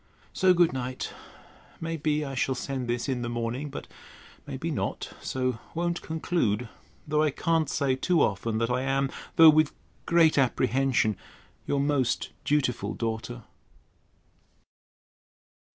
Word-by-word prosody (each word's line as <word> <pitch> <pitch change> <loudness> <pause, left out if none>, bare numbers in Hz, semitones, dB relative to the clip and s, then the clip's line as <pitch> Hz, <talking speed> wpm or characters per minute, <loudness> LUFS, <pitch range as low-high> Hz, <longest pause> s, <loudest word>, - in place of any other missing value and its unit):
So 185 -1 +4
good 175 -4 +4
night. 130 -1 -4 0.7
May 165 0 -3
be 150 -1 0
I 135 - -5
shall 130 0 0
send 130 0 -3
this 120 0 -1
in 130 -3 -1
the 120 - -3
morning; 120 +5 -3
but - - -7 0.6
may - - -5
be - - -3
not; - - -3
so 130 -3 -1 0.2
won't 170 +1 -1
conclude: 155 - -1 0.4
though 150 0 +2
I 155 - +3
can't 160 +1 0
say 135 -2 +1
too 165 +4 +2
often, 110 +3 0
that 115 +2 0
I 125 +1 +1
am 135 0 0 0.2
(though 160 -1 +9
with 155 -1 +2 0.3
great 165 -3 +5
apprehension) 125 -4 +2 0.5
Your 140 - +1
most 140 -3 0
dutiful 125 -8 0
DAUGHTER. 115 +1 -4
135 Hz, 135 wpm, -27 LUFS, 120-155 Hz, 0.7 s, though